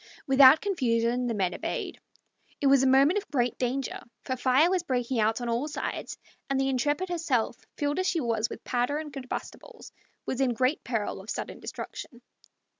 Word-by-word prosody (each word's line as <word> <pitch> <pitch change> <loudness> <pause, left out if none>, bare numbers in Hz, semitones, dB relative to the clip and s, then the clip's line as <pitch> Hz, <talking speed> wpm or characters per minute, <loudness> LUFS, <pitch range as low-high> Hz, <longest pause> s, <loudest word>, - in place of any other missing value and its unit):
Without 270 +2 +7
confusion 245 - 0
the 230 - -1
men 185 -3 0
obeyed. - - -4 0.6
It - - -2
was 275 -1 +6
a 265 - +3
moment 275 +9 +5
of 410 - -14
great 245 -4 0
danger, 255 +2 -2 0.2
for 260 - -2
fire 260 +5 +4
was 370 0 +1
breaking 255 -5 -1
out 220 +2 +2
on 240 - -3
all 235 +5 -1
sides, 305 - -4 0.3
and 275 -1 +1
the 270 0 +1
Intrepid 290 +8 0
herself, 310 -11 0 0.2
filled 290 +3 -1
as 370 - 0
she 340 - +1
was 230 -4 0
with - - -9
powder 250 +3 0
and 305 -1 -6
combustibles, 260 -2 -8 0.3
was 260 - -2
in 250 -3 +1
great 255 +6 +1
peril 220 -5 -3
of 200 - -13
sudden - - -5
destruction. 240 -1 -8
260 Hz, 185 wpm, -28 LUFS, 240-290 Hz, 0.6 s, Without